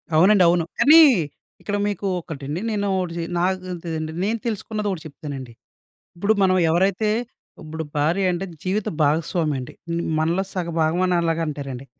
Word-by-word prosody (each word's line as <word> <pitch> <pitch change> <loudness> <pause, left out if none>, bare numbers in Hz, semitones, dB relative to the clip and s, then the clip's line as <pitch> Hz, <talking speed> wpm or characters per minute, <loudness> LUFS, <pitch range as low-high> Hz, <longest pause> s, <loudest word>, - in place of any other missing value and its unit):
అవునండి. 185 +4 +6
అవును. 170 -1 +3
కానీ, 315 +3 +8 0.6
ఇక్కడ 205 0 -2
మీకు 205 -1 -2
ఒకటండి 150 -2 -6
నేను 205 -1 -1
ఒకటి 180 -2 -2
చె 170 - -2
నాకు 185 +1 -1
త్ 175 - -8 0.4
నేను 225 +3 0
తెలుసుకున్నది 215 -1 -3
ఒకటి 180 -4 -4
చెప్తానండి. 140 -4 -8 0.6
ఇప్పుడు 200 +5 +2
మనం 185 -1 +4
ఎవరైతే 195 +5 +2 0.5
ఇప్పుడు 160 +1 -5
భార్య 165 +6 +2
అంటే, 175 +2 -3 0.2
జీవిత 195 +3 -1
భాగస్వామండి. 150 -3 0 0.2
హ్మ్. 170 0 -1 0.2
మనలో 170 +4 +1
సగ 175 -2 -2
భాగమని 175 +3 +2
అలాగంటారండి. 150 -6 -3
175 Hz, 140 wpm, -22 LUFS, 155-195 Hz, 0.6 s, కానీ